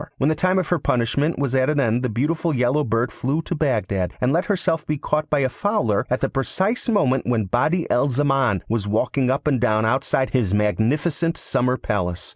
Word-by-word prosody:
When 140 - +1
the 155 - +1
time 185 +2 +1
of 185 - -1
her 175 - +1
punishment 140 +5 0
was 140 -2 -1
at 130 +1 +2
an 150 -1 +1
end 120 -2 +1
the 125 - -1
beautiful 150 +7 -1
yellow 125 +4 +1
bird 115 0 0
flew 145 +6 -2
to - - -4
Bagdad, 105 - -1
and 125 +2 +1
let 175 +3 +1
herself 175 -6 0
be 150 - -1
caught 150 +2 -2
by 150 -2 +2
a 130 - +2
Fowler 125 - -1
at 125 - -1
the - - +2
precise 190 - -2
moment 135 - +1
when 115 -4 +1
Badi 155 - 0
al 140 +4 +2
Zaman 135 -6 +1
was 110 -2 -2
walking 125 +5 0
up 135 +2 -1
and 135 -6 +1
down 110 0 +2
outside 130 +2 0
his 110 -7 +1
magnificent 145 +11 0
summer 125 +1 0
palace. 90 -7 -3
130 Hz, 210 wpm, -22 LUFS, 115-150 Hz, -, at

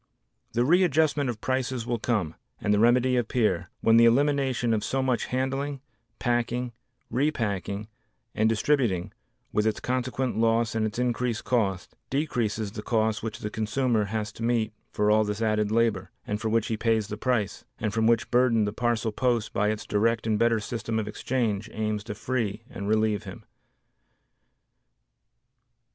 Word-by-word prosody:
The 120 +1 +2
readjustment 155 -4 +3
of 110 -3 -5
prices 130 -2 -1
will 120 -1 -1
come, 105 -10 0 0.3
and 105 - +1
the 105 - +3
remedy 125 +3 +4
appear, 105 -7 0
when 115 0 +5
the 115 - +7
elimination 130 -1 +2
of 105 -2 0
so 135 +3 0
much 125 -4 0
handling, 135 +2 -2 0.4
packing, 120 0 -1 0.4
repacking 110 - -1 0.5
and 110 +1 +2
distributing 115 -5 +1 0.4
with 105 +1 +2
its 110 - 0
consequent 130 -1 -1
loss 115 0 +2
and 110 -1 +1
its 110 - -7
increased 125 -1 -1
cost, 100 -7 -1
decreases 115 -7 -1
the 105 - -6
cost 110 -1 0
which 110 -1 -5
the 105 - -4
consumer 110 0 0
has 110 +1 -3
to 110 - -13
meet 115 -2 +1 0.2
for 105 0 +1
all 110 0 +5
this 105 0 -3
added 110 -2 +1
labor, 110 -4 +1 0.2
and 105 +1 -3
for 110 - -1
which 115 0 +2
he 110 - -2
pays 110 -2 +1
the 105 - -4
price, 105 -3 -1
and 110 -2 -2
from 110 0 +2
which 115 +1 +2
burden 120 -3 +4
the 105 - -3
parcel 115 -1 0
post 120 -1 0
by 105 +1 +2
its 110 0 -3
direct 110 +2 +1
and 110 -2 +1
better 115 -1 +3
system 110 +1 -3
of 110 -2 -1
exchange 110 -1 -1
aims 110 -1 -2
to 105 -1 -6
free 115 -2 -2
and 100 +1 -5
relieve 110 -1 +2
him. - - -9
115 Hz, 165 wpm, -27 LUFS, 105-125 Hz, 0.5 s, the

